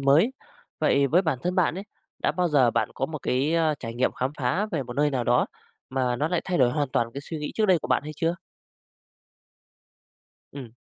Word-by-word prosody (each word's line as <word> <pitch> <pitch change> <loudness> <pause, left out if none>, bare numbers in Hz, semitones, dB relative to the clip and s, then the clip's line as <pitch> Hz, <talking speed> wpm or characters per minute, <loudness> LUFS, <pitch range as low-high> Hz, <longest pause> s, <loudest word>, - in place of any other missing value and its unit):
mới. 145 - +4 0.5
Vậy 140 0 +3
với 170 +7 +3
bản 160 -8 0
thân 180 +1 -1
bạn 180 -4 +2
ấy, 190 +2 -6 0.3
đã - - 0
bao 180 +2 +1
giờ 135 -6 +4
bạn - - 0
có 135 - -1
một 155 +1 -6
cái, 140 +6 +1
ơ, 160 -2 +2
trải 115 0 -6
nghiệm 125 +2 +1
khám 130 +1 -2
phá 145 +11 0
về 165 -9 -2
một 120 -1 -7
nơi 145 +1 +3
nào 130 -3 -1
đó - - +3 0.4
mà 130 -2 0
nó 150 +5 0
lại 175 -1 0
thay 185 -2 -1
đổi 125 -3 +4
hoàn 145 +2 -1
toàn 115 -2 -1
cái 140 - -4
suy 155 +2 -6
nghĩ 150 - -4
trước 220 - +2
đây 185 -3 +4
của - - -7
bạn - - +2
hay 150 +1 -6
chưa? 165 +2 0 2.2
Ừm. 135 -4 -8
145 Hz, 225 wpm, -26 LUFS, 130-170 Hz, 2.2 s, mới